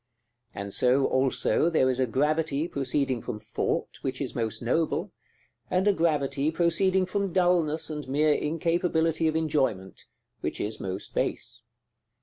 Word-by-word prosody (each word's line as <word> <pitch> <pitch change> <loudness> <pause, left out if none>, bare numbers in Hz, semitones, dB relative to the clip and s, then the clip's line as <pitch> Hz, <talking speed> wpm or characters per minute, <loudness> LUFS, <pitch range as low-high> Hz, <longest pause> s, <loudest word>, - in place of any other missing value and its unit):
And 100 0 -5
so, 130 +2 +3
also, 135 +5 +2
there 155 -6 +3
is 130 0 0
a 130 - +2
gravity 150 +4 0
proceeding 135 -4 -1
from 110 -2 -5
thought, 105 - -3
which 130 -1 -3
is 135 -4 -3
most 110 -2 -2
noble; 155 +7 0 0.6
and 185 +2 +1
a 205 - +5
gravity 150 -4 +1
proceeding 180 +3 +2
from 200 0 -2
dulness 170 -3 +2
and 150 -2 -5
mere 150 +3 +3
incapability 165 +1 0
of 155 - 0
enjoyment, 135 -12 -1 0.3
which - - -3
is 110 +1 -3
most 95 +1 -5
base. 120 0 -3
150 Hz, 140 wpm, -27 LUFS, 130-165 Hz, 0.6 s, a